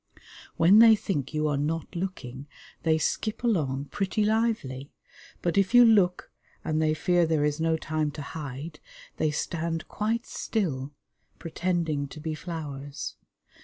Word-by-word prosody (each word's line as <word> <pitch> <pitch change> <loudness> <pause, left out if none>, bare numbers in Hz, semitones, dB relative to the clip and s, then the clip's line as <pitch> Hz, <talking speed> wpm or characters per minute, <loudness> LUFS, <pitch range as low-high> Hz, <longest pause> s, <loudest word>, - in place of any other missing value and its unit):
When 185 +6 +7
they 225 -1 +9
think 150 -10 -3
you 155 0 0
are 145 -2 0
not 160 +4 -2
looking 145 -7 -5 0.3
they 160 -1 +2
skip 215 +9 -2
along 145 - 0
pretty 205 +2 0
lively, 210 - -1 0.5
but 175 +3 +2
if 195 +5 +1
you 245 0 +9
look 195 -6 +3 0.3
and 155 -1 0
they 155 0 +2
fear 175 +1 +2
there 155 -2 +2
is 150 +1 -1
no 160 0 +2
time 155 -1 -1
to 150 - -6
hide, 145 +1 -7 0.4
they 155 - +1
stand 165 +1 -3
quite 225 +3 -1
still, 145 - -2 0.5
pretending 165 -4 -1
to 155 - -10
be 155 +1 -3
flowers. 145 -4 -6
160 Hz, 145 wpm, -27 LUFS, 145-190 Hz, 0.5 s, they